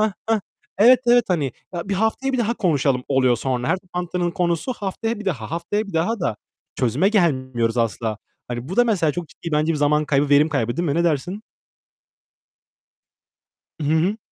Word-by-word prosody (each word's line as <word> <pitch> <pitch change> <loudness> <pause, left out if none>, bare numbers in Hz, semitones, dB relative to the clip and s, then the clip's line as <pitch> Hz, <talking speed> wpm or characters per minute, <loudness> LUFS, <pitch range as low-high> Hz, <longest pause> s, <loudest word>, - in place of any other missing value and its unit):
Hıh, 215 -1 +2 0.2
hıh. 220 -2 +3 0.4
Evet, 245 +4 +7
evet, 240 0 +5
hani, 150 -8 0 0.2
ya 175 +2 -4
"Bir 200 - 0
haftaya 220 +7 0
bir 260 - 0
daha 235 0 +1
konuşalım." 140 - +1
oluyor 130 -3 +3
sonra. 125 0 -2
Her 185 - +2
toplantının 180 -1 -3
konusu 170 +5 -1
haftaya 225 +1 -3
bir - - -7
daha, 140 - -3
haftaya 175 +6 -2
bir 200 - -10
daha 175 +7 0
da 110 -11 -1 0.4
çözüme 125 - +2
gelmiyoruz 130 - +1
asla. 110 -1 -1 0.3
Hani, 120 +3 -5
bu 190 - -5
da 245 - +6
mesela 175 -10 +1
çok 175 -3 -5
ciddi 170 - -8
bence 155 +2 +2
bir 150 - -2
zaman 150 +1 +2
kaybı, 140 0 +1
verim 145 +2 +5
kaybı. 120 -6 -1
Değil 175 - -1
mi? 140 - 0
Ne 170 +1 +1
dersin? 175 +7 -1 2.4
Hı - - -2
hı. 180 +7 +1
170 Hz, 185 wpm, -22 LUFS, 135-200 Hz, 2.4 s, Evet